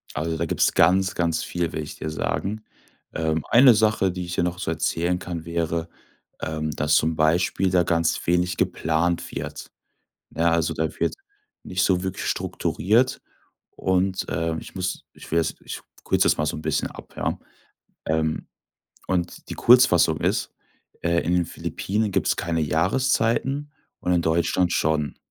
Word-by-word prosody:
Also, 80 +2 -2
da 85 - -1
gibt's - - +1
ganz, 95 +3 +4
ganz 85 -2 0
viel, 85 -1 -2
will 80 - -3
ich 75 - -8
dir 80 - -4
sagen. 100 +6 -3 0.5
Ähm, 80 -1 -1
eine 125 0 +8
Sache, 105 -3 +2
die 90 0 -5
ich 90 0 -5
dir - - +1
noch 90 0 -1
so - - -2
erzählen 85 +2 0
kann, 85 -3 -6
wäre, 85 0 -2 0.5
ähm, 80 -1 -2
dass 75 +1 +1
zum 80 +1 +2
Beispiel 85 +4 +2
da 90 -1 +3
ganz 85 -1 0
wenig 90 +1 +1
geplant 85 +2 0
wird. - - -6 0.7
Ja, 85 +1 +3
also, 85 -1 +1
da 80 - -1
wird - - 0 0.5
nicht 90 -1 -1
so 90 -1 +2
wirklich 95 0 -4
strukturiert 115 +8 +1 0.6
und, 95 0 0
äh, 80 -1 -1
ich - - -10
muss 90 -1 -3
ich - - -13
will 85 - +2
das 80 -1 0
Ich - - -7 0.2
kürze - - +2
das - - +3
mal 75 - +1
so - - -2
'n 80 - -7
bisschen - - -1
ab, - - -13
ja. - - -2 0.7
Ähm, 80 0 0 0.6
und 90 -1 -2
die - - -3
Kurzfassung 90 - +5
ist, - - 0 0.5
äh, 85 0 +2
in 85 - 0
den 90 -1 +2
Philippinen 105 0 -2
gibt's - - +1
keine 85 -2 -1
Jahreszeiten 130 - +1 0.3
und 90 - 0
in 85 -1 +2
Deutschland 85 +2 +1
schon. 75 -2 0
85 Hz, 165 wpm, -24 LUFS, 80-95 Hz, 0.7 s, eine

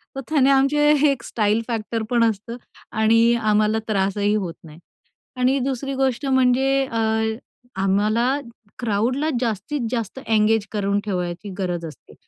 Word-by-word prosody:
तर 270 - -4
त्याने 275 -3 +3
आमचे 275 +2 +3 0.2
एक 270 - -4
स्टाईल 215 0 0
फॅक्टर 225 -1 -3
पण 240 -2 +3
असतं 225 +1 -1 0.4
आणि 230 +2 +4
आम्हाला 215 -1 +2
त्रासही 200 0 0
होत 185 -5 -2
नाही. 160 0 -13 0.6
आणि 255 +2 +2
दुसरी 275 +1 -3
गोष्ट 265 0 -1
म्हणजे 260 0 +3 0.2
अ, 230 -3 -3 0.8
आम्हाला 215 +7 +1 0.4
क्राउडला 245 +6 0
जास्तीत 240 +5 -2
जास्त 235 0 -3
एंगेज 220 -1 +2
करून 200 -1 0
ठेवायची 180 0 -4
गरज 175 -3 -2
असते, 155 - -13
225 Hz, 130 wpm, -22 LUFS, 205-260 Hz, 0.8 s, आणि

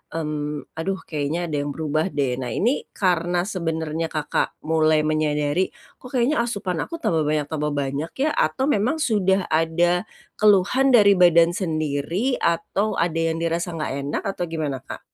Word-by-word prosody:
mmm, 150 -2 -3
"Aduh 190 +4 -2
kayaknya 155 +3 -2
ada 155 - -3
yang 145 - -3
berubah 155 +2 0
deh." 135 -4 0
Nah, 125 - -4
ini 240 +7 0
karena 175 -2 +1
sebenernya 165 -4 -2
Kakak 155 -2 -2
mulai 155 0 +3
menyadari, 155 +2 0 0.3
"Kok 255 - -11
kayaknya 245 +1 +2
asupan 200 -7 -3
aku 335 - -7
tambah 160 - +1
banyak 150 -1 0
tambah 150 -1 -1
banyak 145 +2 -2
ya?" 300 +2 +2
Atau 210 - +1
memang 245 +3 +2
sudah 195 - +1
ada 170 +3 +2 0.4
keluhan 215 +6 +4
dari 205 -4 +6
badan 170 -1 +6
sendiri, 160 - -1
atau 190 +5 0
ada 170 -1 0 0.2
yang 165 - -3
dirasa 170 +1 -1
nggak 155 -4 -3 0.2
enak, - - -2
atau 195 -2 -3
gimana, 150 -5 -3
Kak? - - -8
165 Hz, 160 wpm, -23 LUFS, 155-195 Hz, 0.4 s, dari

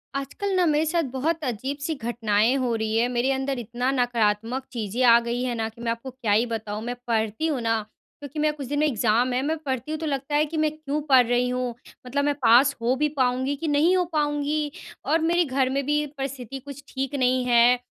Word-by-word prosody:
आजकल 390 +9 -3
ना 365 -1 +3
मेरे 305 -1 +2
साथ 335 +1 +1
बहुत 310 +5 -1
अजीब-सी 280 +5 -3
घटनाएँ 230 -2 +1
हो 250 -3 0
रही 220 0 -1
हैं, 235 +2 +3
मेरे 250 +2 +1
अंदर 265 -1 -1
इतना 240 +3 -2
नकारात्मक 240 0 0
चीज़ें 230 0 -2
आ 235 -1 +7
गई 245 +1 -1
है 250 - -1
ना, 225 -1 -1
कि 225 +1 -15
मैं 230 -1 -1
आपको 230 +3 -5
क्या 240 -4 -3
ही 215 +4 +4
बताऊँ? 220 -2 -4
मैं 245 +1 -3
पढ़ती 220 +6 0
हूँ 275 -6 -1
ना, 225 -1 +1 0.4
क्योंकि 290 +1 -7
मेरा 305 0 +2
कुछ 275 -3 -6
दिन 290 +2 -1
में 305 - +3
एग्ज़ाम 240 0 +1
है, 250 - +1
मैं 310 +4 -1
पढ़ती 260 +1 -3
हूँ 310 - -3
तो 320 - -4
लगता 280 0 -2
है 300 +1 +3
कि 315 +1 -5
मैं 310 0 +2
क्यों 300 -1 -3
पढ़ 260 -2 +7
रही 245 +1 +2
हूँ? 250 -1 -2 0.3
मतलब 285 +3 0
मैं 290 - +2
पास 255 +5 +6
हो 240 +2 +2
भी 300 +3 +1
पाऊँगी 255 +3 0
कि - - 0
नहीं 305 +5 +3
हो 365 - +3
पाऊँगी? 295 0 0 0.3
और 325 - +2
मेरे 340 +2 +2
घर 265 -2 +1
में 275 +1 -1
भी 295 +1 +1
परिस्थिति 270 -1 -5
कुछ 280 +1 -10
ठीक 270 +1 -3
नहीं 255 -1 +2
है 245 0 +5
260 Hz, 230 wpm, -25 LUFS, 240-290 Hz, 0.4 s, आ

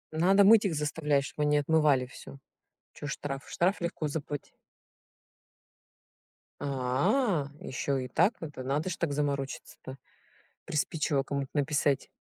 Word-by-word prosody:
Надо 190 +5 +5
мыть 215 +2 +7
их 180 -5 0
заставлять, 150 -1 0
чтоб 150 - -6
они 150 0 +3
отмывали 145 -3 +3
всё. 135 +2 -11 0.6
Чё 145 - -7
штраф? 135 0 -5
Штраф 185 +4 +1
легко 170 -3 -2
забыть. 145 -1 -5 2.0
А, 145 - +1
ещё 135 +2 -2
и 130 -1 -3
так. 185 - +3
Это 145 -5 -6
надо 145 +7 -1
ж 180 - -4
так 160 -4 -1
заморочиться-то. 140 -2 -4 0.7
Приспичило 150 -1 0
кому-то 140 -1 -3
написать. 145 -1 +1
145 Hz, 120 wpm, -29 LUFS, 140-160 Hz, 2.0 s, мыть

